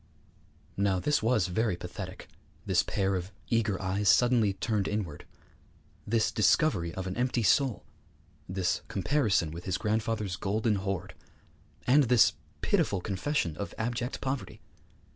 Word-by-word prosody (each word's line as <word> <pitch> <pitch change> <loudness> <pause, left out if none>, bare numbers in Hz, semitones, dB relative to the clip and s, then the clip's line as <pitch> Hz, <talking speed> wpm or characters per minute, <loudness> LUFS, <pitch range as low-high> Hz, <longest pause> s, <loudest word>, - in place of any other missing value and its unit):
_' - - -33 0.7
Now 100 -2 +1
this 150 +10 +1
was 110 -4 +2
very 95 +2 0
pathetic, - - -8 0.4
this - - +3
pair 95 0 -1
of 90 +1 -4 0.2
eager 110 -4 +1
eyes 95 +2 0
suddenly 115 -2 +4
turned 105 0 -1
inward; 100 -8 -4 0.8
this 110 0 +2
discovery 100 - +2
of 95 - -4
an 95 0 -4
empty 125 -1 0
soul; 130 +4 +2 0.6
this 90 -1 0
comparison 100 - +1
with 85 +2 -8
his 95 - -1
grandfather's 110 -3 -1
golden 105 +2 0
hoard; 95 -1 -3 0.7
and 140 +3 +5
this 120 -2 +5 0.3
pitiful 100 - +1
confession 95 - -1
of 100 - -5
abject 120 +2 -3
poverty. 130 0 -4
105 Hz, 135 wpm, -29 LUFS, 95-115 Hz, 0.8 s, and